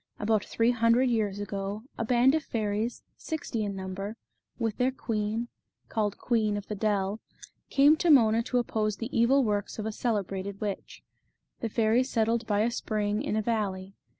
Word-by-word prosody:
About 210 -1 +1
three 230 +1 +1
hundred 240 +2 +3
years 210 -3 0
ago 200 +1 -4
a - - -2
band 245 +3 +4
of 315 -1 +1
fairies, 215 +1 -2
sixty 290 -8 -3
in 200 -1 -3
number, 195 +3 -5 0.4
with 225 -3 -2
their 250 +1 +3
queen, 225 -2 -2 0.4
called 210 -2 -1
Queen 215 -4 +1
of 205 - -6
the - - -5
Dell, 205 0 0 0.5
came 290 +3 +6
to 345 - +1
Mona 230 -6 +6
to 250 +1 -1
oppose 215 -3 0
the 230 +3 -5
evil 260 +4 +4
works 205 -3 -1
of 215 - -4
a 220 - -1
celebrated 200 -3 -2
witch. 205 -2 -5 0.6
The 230 - -2
fairies 230 +4 +2
settled 230 0 +1
by 205 -1 +2
a 230 +2 +2
spring, 210 -2 -1
in 285 -6 -2
a 215 - 0
valley. 195 -4 -2
220 Hz, 175 wpm, -28 LUFS, 205-235 Hz, 0.6 s, came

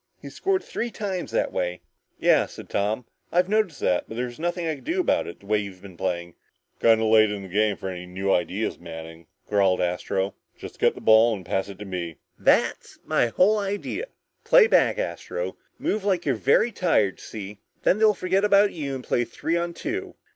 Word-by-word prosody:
He's - - -10
scored 385 -1 0
three 235 - -3
times 195 -5 -4
that - - -1
way!" 90 -1 -2 0.4
"Yeah," - - +4
said - - -11
Tom, 105 +4 -1 0.3
"I 175 - +3
noticed 195 -5 0
that, 90 - +1
but 110 - -8
there 125 - 0
was 120 +2 -9
nothing 175 +1 -2
I 160 - 0
could 140 - -11
do 340 +4 -1
about 365 - +1
it, 85 - -9
the - - -17
way 105 +1 +2
you've 100 -2 -8
been 95 -3 -11
playing." 85 -1 -3 0.5
"Kinda 110 -1 +4
late 110 -1 +5
in 100 -1 -5
the - - -8
game 105 +2 +1
for - - -6
any 90 -1 -6
new 95 +2 -1
ideas, 95 +5 -1
Manning," 80 0 -9 0.2
growled 100 -3 +3
Astro. 95 +2 -1 0.2
"Just - - -10
get - - +3
the - - -10
ball 110 +1 +6
and 95 -3 -10
pass 95 +1 -1
it 100 - -9
to 105 - -8
me." 90 -4 -4 0.2
"That's - - +2
my - - +2
whole 200 - +3
idea! 205 - -3 0.4
Play - - +7
back, 465 - +3
Astro. - - -4 0.2
Move 210 -1 -1
like 190 -4 0
you're 140 - +2
very 140 - +3
tired, 165 - +1
see? 105 -1 -8 0.2
Then 195 - +3
they'll 215 -1 +5
forget 185 +2 0
about 205 0 +4
you 140 -5 -4
and 130 - -6
play 120 - +1
three 165 +7 -3
on 170 0 -1
two. 390 - -4
110 Hz, 205 wpm, -25 LUFS, -, 0.5 s, Play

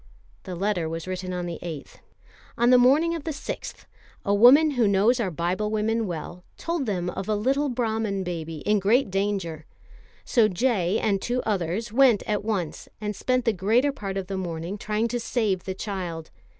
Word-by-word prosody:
The 185 - -5
letter 180 -3 -1
was 165 0 -5
written 185 0 -4
on 180 -1 -3
the 170 -2 -5
8th: 160 -5 -7 0.6
"On 240 +1 +4
the 250 - +7
morning 290 +7 +4
of 330 -3 -4
the 325 - -4
6th, 295 -2 -6 0.4
a 200 - +2
woman 265 +9 +7
who 245 -6 +2
knows 205 +6 +3
our 215 -5 0
Biblewomen 210 +6 -1
well, 175 +1 -6
told 335 -6 -2
them 180 -4 -1
of 190 +3 -5
a 215 - +2
little 270 +7 +1
Brahman 220 -5 -1
baby 165 -3 -5
in 210 0 +2
great 215 +3 +2
danger; 190 -6 -2 0.6
so 230 -4 +4
J. 200 -2 +1
and 200 -4 0
two 245 +1 -1
others 205 +2 -2
went 245 -5 +5
at 210 -1 -1
once 195 -7 -3
and 210 -1 -3
spent 255 +4 0
the 230 - +3
greater 225 +9 +2
part 195 -7 -5
of 195 - -3
the 195 +1 -4
morning 170 +1 -4
trying 215 +2 -1
to 240 +1 -2
save 215 -6 -1
the 190 - -4
child. 180 -6 -5
205 Hz, 185 wpm, -25 LUFS, 180-235 Hz, 0.6 s, the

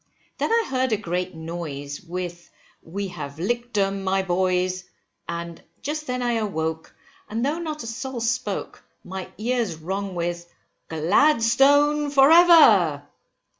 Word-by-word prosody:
Then - - 0
I 460 0 +3
heard 260 -1 0
a - - +2
great 180 -2 -3
noise, 160 -4 -6
with, 175 0 -6 0.3
We 195 +4 -5
have 145 -5 -7
lick'd 240 +7 -3
them, 195 -1 +1
my 190 0 +1
boys, 185 0 0 0.4
and 170 0 -5 0.2
just 305 +1 -4
then 250 0 -2
I 240 -1 +1
awoke, 160 -6 -3 0.3
and 230 +4 -1
though 300 +4 -1
not 310 -4 -5
a - - -8
soul 255 +2 -5
spoke, 230 -3 -3 0.2
my 190 0 -7
ears 230 -5 -1
rung 190 +4 -4
with 175 0 -4 0.4
GLADSTONE 285 - +3
FOR 280 +1 +5
EVER! 260 - +6
195 Hz, 135 wpm, -24 LUFS, 175-255 Hz, 0.4 s, EVER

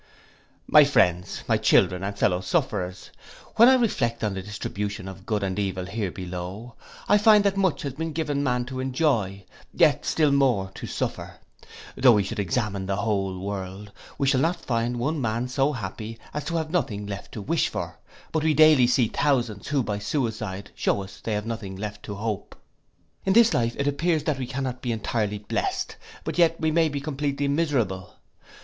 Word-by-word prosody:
My 150 - +7
friends, 90 -11 +1
my - - +3
children, 90 0 +3
and 100 +1 -4
fellow 90 -2 +2
sufferers, 95 - -2 0.5
when 235 +3 +9
I 265 - +7
reflect 120 - 0
on 105 -2 0
the 95 - -4
distribution 100 0 -5
of 95 0 -10
good 105 -2 0
and 95 0 -2
evil 95 -2 -2
here 100 +1 -3
below, 90 +6 -7 0.3
I 205 - +5
find 210 0 +6
that 200 -1 +2
much 190 -4 +1
has 140 -3 -3
been 160 +3 -4
given 150 -2 -1
man 125 -3 0
to 130 +1 -6
enjoy, 125 - 0 0.3
yet - - +3
still 155 -3 +2
more 125 -9 +2
to - - -7
suffer. - - -4 0.6
Though 125 -2 +6
we 105 -2 +3
should 100 - -5
examine 100 0 -1
the 100 - 0
whole 95 -3 -1
world, 100 +1 -6 0.3
we 140 - 0
shall 135 -1 +3
not 165 +4 +2
find 120 0 0
one 145 +5 -1
man 115 +1 -1
so 135 +3 +1
happy 115 -1 -6 0.2
as 150 -1 -4
to 170 +2 -3
have 160 -1 -2
nothing 105 - -1
left 100 0 -7
to 110 - -5
wish 165 +7 +1
for; - - -5 0.3
but 160 -1 0
we 155 -1 +2
daily 155 -4 +7
see 125 -1 +3
thousands 120 -7 0
who 140 -3 +1
by 105 -2 -3
suicide 105 -4 -3
shew - - 0
us 95 0 -11
they 110 - -2
have 105 0 -2
nothing 110 -4 -5
left 105 +1 -6
to 100 - -5
hope. 105 -1 -4 0.7
In 190 - +2
this 230 +1 +6
life 115 -1 +1
then - - -3
it 140 - 0
appears 155 +2 +1
that 150 -3 -1
we 130 - -3
cannot 130 -1 -4
be 120 - -2
entirely 105 -1 -1
blest; 105 0 -2 0.3
but - - -3
yet 165 -1 +4
we 160 -1 +1
may 165 0 +3
be 145 -1 -3
completely 140 -1 -2
miserable! 135 - -1
120 Hz, 195 wpm, -25 LUFS, 100-145 Hz, 0.7 s, when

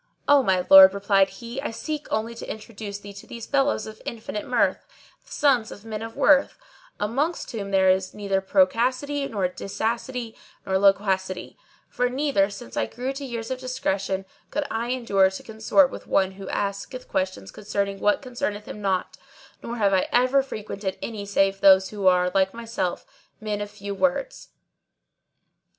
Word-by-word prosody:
"O 285 -1 +6
my 185 -6 +1
lord," 190 0 +10
replied 195 -1 +3
he, 240 +3 -7
"I 295 - -3
seek 300 +6 -5
only 220 +2 -1
to 230 - -9
introduce 215 -2 -7
thee 200 0 -11
to 200 - -12
these 235 -2 -8
fellows 280 -5 +1
of 215 0 -10
infinite 220 -2 -5
mirth, - - +1 0.4
the - - -22
sons 255 -6 +2
of 205 - -11
men 215 -1 -5
of 225 0 -7
worth, 285 -1 +4 0.4
amongst 275 +11 -1
whom 205 -4 -5
there 190 -1 +3
is 185 0 +2
neither 195 -2 -1
procacity 255 +9 +1
nor 200 -6 -1
dicacity 230 +5 -4 0.3
nor 190 0 +1
loquacity; 190 -2 +1 0.3
for 250 0 0
never, 260 -7 +1
since 195 - -10
I 110 - 0
grew 255 - -4
to 275 +1 -7
years 235 -2 -5
of 260 - -3
discretion, 195 -7 -2 0.2
could 300 0 -2
I 230 +1 -2
endure 205 -7 +3
to 190 - -8
consort 220 +6 +2
with - - -9
one 190 -1 +2
who 195 0 -9
asketh 200 +6 -4
questions 185 - -3
concerning 200 -1 -3
what 205 +6 +2
concerneth 240 -5 -4
him 210 - -8
not, 190 -2 -1 0.4
nor 235 +1 -5
have 200 -3 +2
I 185 - +2
ever 255 +3 +4
frequented 210 -6 -5
any 210 -3 -5
save 195 -1 +1
those 190 -1 +6
who 205 -3 -1
are, 180 0 +4
like 190 +1 +2
myself, 230 -6 -3 0.3
men 210 -1 -3
of 205 - -4
few 205 -1 -6
words. 280 - -1
210 Hz, 170 wpm, -24 LUFS, 195-245 Hz, 0.4 s, lord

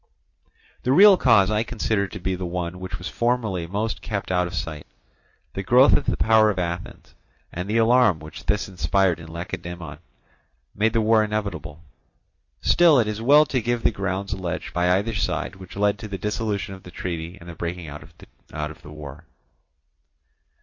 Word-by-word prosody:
The 125 - 0
real 200 +7 +8
cause 110 - +4
I 105 0 +1
consider 110 -3 -1
to 105 - -8
be 95 +1 -2
the 90 0 -4
one 90 0 -4
which 90 -1 -5
was 90 - -7
formally 115 -8 -1
most 105 +5 -3
kept 100 -4 -4
out 90 -1 +1
of 85 - -7
sight. 80 -3 -5 0.7
The 95 - -3
growth 125 +8 +5
of - - +2
the - - 0
power 110 -1 +4
of 100 - -2
Athens, 90 0 -5 0.4
and 90 +3 -5
the 110 - +1
alarm 115 -4 +4
which 80 0 -11
this 105 -1 +1
inspired 95 -2 +1
in 80 - -10
Lacedaemon, 85 -3 -7 0.7
made 110 +2 0
war 110 0 +4
inevitable. 100 -8 -4 0.8
Still 170 -4 +5
it 110 - +2
is 105 +1 -3
well 145 +6 +6
to 130 -3 -1
give 120 +1 -1
the - - +3
grounds 100 -1 -3
alleged 90 -3 -4
by 90 0 +1
either 100 +5 +1
side 105 - -2
which 95 -1 -12
led 100 0 +1
to 110 - -7
the 100 -2 -5
dissolution 105 0 -3
of 95 - -11
the 90 - -12
treaty 85 0 -5
and 85 - -13
the 85 - -7
breaking 85 +1 -5
out 75 0 -8
of 75 -1 -9
the - - -12
war. 75 +1 -10
95 Hz, 180 wpm, -23 LUFS, 85-110 Hz, 0.8 s, real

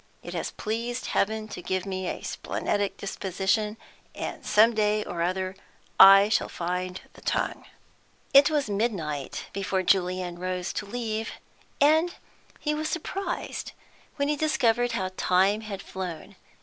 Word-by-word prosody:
It - - -7
has - - -2
pleased 235 +3 -3
Heaven 215 +1 0
to 180 - -7
give 185 +1 -2
me 190 -1 -3
a - - -4
splenetic 200 -1 -2
disposition, 200 +2 -1 0.4
and - - -5
some 220 +3 +5
day 210 -1 +2
or 170 - -4
other 185 +2 -1 0.4
I 195 +1 +10
shall 215 - +1
find 180 +1 -3
the - - -16
tongue." - - -1 0.7
It 275 +1 +8
was 295 -4 +1
midnight 190 - -2
before 190 -1 -1
Julian 180 -1 +1
rose 180 0 -3
to 210 - -4
leave, 225 0 -3 0.5
and 315 +4 +4 0.4
he 300 - 0
was 310 +1 -2
surprised 365 +3 -4 0.4
when 285 -1 0
he 300 - +1
discovered 245 -6 +2
how 190 -4 -1
time 190 +4 +3
had 210 -3 -6
flown. 180 -4 -6
205 Hz, 140 wpm, -27 LUFS, 185-235 Hz, 0.7 s, I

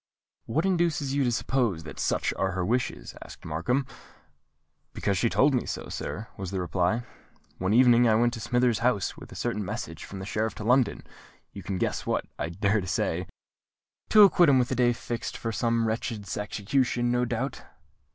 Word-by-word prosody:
"What 155 +10 0
induces 170 -7 +1
you 140 0 +2
to 120 - +1
suppose 115 -7 0
that 70 -4 -9
such - - 0
are 95 -1 -1
her 95 -1 -1
wishes?" 115 - -2
asked - - -13
Markham. 105 - 0 1.1
"Because 100 - -1
she 115 +5 +2
told 140 +5 +3
me 125 - 0
so, - - -5
sir," 110 +3 -5
was 95 -2 -5
the 95 0 -3
reply. 90 +6 0 0.6
"One 95 +1 0
evening 120 -1 +6
I 110 - +4
went 120 +1 +2
to 115 - -5
Smithers' 120 0 +1
house, 115 -5 +1
with - - -12
a - - -10
certain 115 -3 -2
message 90 - -5
from 100 - -8
the 95 - -6
Sheriff 105 -1 -2
of 105 - -5
London—you 120 -4 -2
can 95 0 -3
guess - - -2
what, - - 0
I 80 - -2
dare 100 +3 0
say——" 90 0 -1 0.8
"To 215 -1 +8
acquaint 180 -4 +6
him 135 - +5
with 125 -1 +2
the 130 - -1
day 120 0 +3
fixed 120 0 -5
for 115 - -3
some 115 0 +1
wretch's 110 -3 -3
execution, 120 +4 0
no 125 0 +2
doubt?" 125 +3 -3
115 Hz, 185 wpm, -27 LUFS, 95-125 Hz, 1.1 s, To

